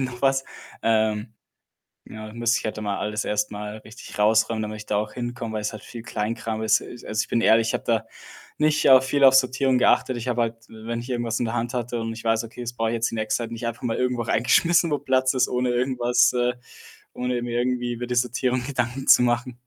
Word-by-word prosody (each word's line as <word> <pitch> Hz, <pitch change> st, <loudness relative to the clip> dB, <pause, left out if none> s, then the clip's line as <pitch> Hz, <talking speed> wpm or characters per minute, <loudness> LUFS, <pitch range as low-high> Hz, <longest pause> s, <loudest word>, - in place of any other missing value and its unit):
noch 125 Hz, -2 st, -4 dB
was, 135 Hz, -1 st, +2 dB, 0.4 s
ähm. 110 Hz, 0 st, +1 dB, 0.8 s
Ja, 110 Hz, 0 st, -8 dB
da -, -, -11 dB
müsste 120 Hz, 0 st, +1 dB
ich -, -, -11 dB
halt 110 Hz, -, -3 dB
da -, -, -5 dB
mal 100 Hz, -1 st, -2 dB
alles 105 Hz, 0 st, -2 dB
erst 105 Hz, 0 st, -1 dB
mal 105 Hz, +1 st, -6 dB
richtig 110 Hz, +3 st, -12 dB
raus 110 Hz, +1 st, +3 dB
räumen, 110 Hz, -1 st, -2 dB
damit 110 Hz, 0 st, -5 dB
ich 105 Hz, 0 st, -10 dB
da -, -, -2 dB
auch 105 Hz, +1 st, -2 dB
hinkomme, 120 Hz, -2 st, -5 dB
weil 110 Hz, -, -1 dB
es 105 Hz, -, -2 dB
halt 110 Hz, -, -9 dB
viel 115 Hz, -1 st, -9 dB
Kleinkram 110 Hz, 0 st, -3 dB
ist. 110 Hz, 0 st, +3 dB
Es 120 Hz, -, -10 dB
also, 110 Hz, +1 st, -2 dB
ich -, -, -16 dB
bin 115 Hz, -, +1 dB
ehrlich, 115 Hz, 0 st, +4 dB
ich -, -, -3 dB
habe -, -, -1 dB
da 115 Hz, -1 st, 0 dB, 0.5 s
nicht 150 Hz, -1 st, +2 dB
auf 130 Hz, -1 st, +7 dB
viel 140 Hz, +1 st, +2 dB
auf 135 Hz, 0 st, +8 dB
Sortierung 130 Hz, 0 st, +3 dB
geachtet. 125 Hz, 0 st, +3 dB
Ich 120 Hz, +1 st, -5 dB
habe 120 Hz, -1 st, +1 dB
halt, 115 Hz, 0 st, -1 dB
w 110 Hz, 0 st, -12 dB
wenn 115 Hz, 0 st, -2 dB
ich 120 Hz, +2 st, -9 dB
irgendwas 120 Hz, -2 st, -2 dB
in 120 Hz, -, 0 dB
der 115 Hz, -, -3 dB
Hand 120 Hz, +1 st, -2 dB
hatte 120 Hz, 0 st, -2 dB
und 115 Hz, 0 st, -3 dB
ich 115 Hz, -, -9 dB
weiß: 115 Hz, 0 st, +1 dB
„Okay, 115 Hz, +2 st, -10 dB
das 120 Hz, 0 st, -5 dB
brauche 115 Hz, -1 st, -1 dB
ich -, -, -2 dB
jetzt 115 Hz, 0 st, 0 dB
die -, -, -5 dB
nächste 110 Hz, -1 st, -1 dB
Zeit 115 Hz, -, -5 dB
nicht“ 115 Hz, 0 st, -5 dB
einfach 115 Hz, 0 st, -5 dB
mal 120 Hz, -2 st, -1 dB
irgendwo 125 Hz, -1 st, 0 dB
reingeschmissen, 145 Hz, +10 st, +3 dB
wo 145 Hz, -, +1 dB
Platz 130 Hz, -1 st, +1 dB
ist, 130 Hz, -, +2 dB
ohne 125 Hz, 0 st, 0 dB
irgendwas, 120 Hz, -1 st, +2 dB
äh 125 Hz, 0 st, +1 dB, 0.6 s
ohne 125 Hz, -1 st, -2 dB
mir 120 Hz, 0 st, -2 dB
irgendwie 120 Hz, 0 st, -1 dB
über 120 Hz, +1 st, -5 dB
die 125 Hz, -, -2 dB
Sortierung 125 Hz, +1 st, 0 dB
Gedanken 130 Hz, -1 st, -3 dB
zu -, -, +8 dB
machen. 125 Hz, +1 st, -1 dB
120 Hz, 255 wpm, -24 LUFS, 110-125 Hz, 0.8 s, auf